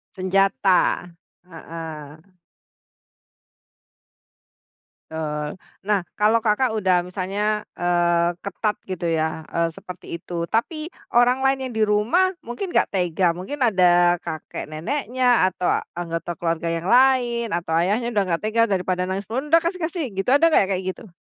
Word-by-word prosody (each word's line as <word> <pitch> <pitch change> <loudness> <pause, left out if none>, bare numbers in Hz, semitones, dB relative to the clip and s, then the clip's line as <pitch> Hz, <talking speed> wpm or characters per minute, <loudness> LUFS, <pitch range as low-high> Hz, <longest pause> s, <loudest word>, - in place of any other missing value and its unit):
Senjata, 190 -1 +2 0.4
heeh. 160 0 -9 2.7
Tul. 150 -2 -3 0.4
Nah 205 -2 +3 0.2
kalau 220 +2 +4
Kakak 220 +2 +1
udah 185 -3 +3
misalnya, 205 +3 -2
eee, 175 -1 +2
ketat 210 +1 -2
gitu 185 -2 -5
ya, 160 0 -1
eee, 170 0 0
seperti 180 -3 -9
itu 170 -1 -4
tapi 310 +8 -1 0.3
orang 245 +2 +4
lain 270 0 +3
yang - - -9
di 220 - +3
rumah 235 - +2
mungkin 240 +11 -5
nggak - - +2
tega. 180 -1 +1
Mungkin 275 +11 -6
ada 175 -4 +4
kakek 155 -1 -6
neneknya, 245 - +1
atau 180 0 -3 0.3
anggota 165 0 -3
keluarga 170 0 -2
yang 165 +2 -3
lain, 245 -2 +4
atau 170 -2 -3
ayahnya 210 +7 +1
udah 205 -2 +2
nggak 170 -1 -1
tega 220 +2 +1
daripada 185 -1 0
nangis 190 +1 -3
pun, 260 +6 -3
"Udah 330 +1 +5
kasih 360 +2 -2
kasih!" 335 0 -2
gitu 195 +5 -1
ada 325 +4 +5
nggak 195 - +4
kayak 185 - -4
gitu? 220 -7 -14
190 Hz, 140 wpm, -22 LUFS, 175-235 Hz, 2.7 s, Udah